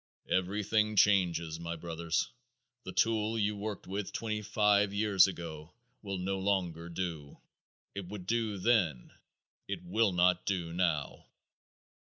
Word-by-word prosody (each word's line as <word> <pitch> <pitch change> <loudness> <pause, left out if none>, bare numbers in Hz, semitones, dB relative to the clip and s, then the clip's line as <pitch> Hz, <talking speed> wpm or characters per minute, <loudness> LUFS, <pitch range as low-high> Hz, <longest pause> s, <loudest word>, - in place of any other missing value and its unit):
Everything 105 +3 +1
changes, 85 -6 +3
my 85 0 -4
brothers. 85 0 -2 0.5
The 95 - -5
tool 110 +1 +1
you 105 -1 +1
worked 105 0 -5
with 100 +1 -4
twenty 110 -2 -3
five 105 -1 +2
years 100 -3 +5
ago 85 -2 -7 0.3
will 100 -2 -4
no 95 +1 -2
longer 90 -4 -1
do. 85 -5 -5 0.6
It 100 -3 -6
would 95 -1 -7
do 110 -1 0
then; 90 - +1 0.6
it 95 -3 -4
will 100 +4 +2
not 90 0 +3
do 85 -4 -1
now. 85 -5 -1
95 Hz, 130 wpm, -32 LUFS, 85-105 Hz, 0.6 s, years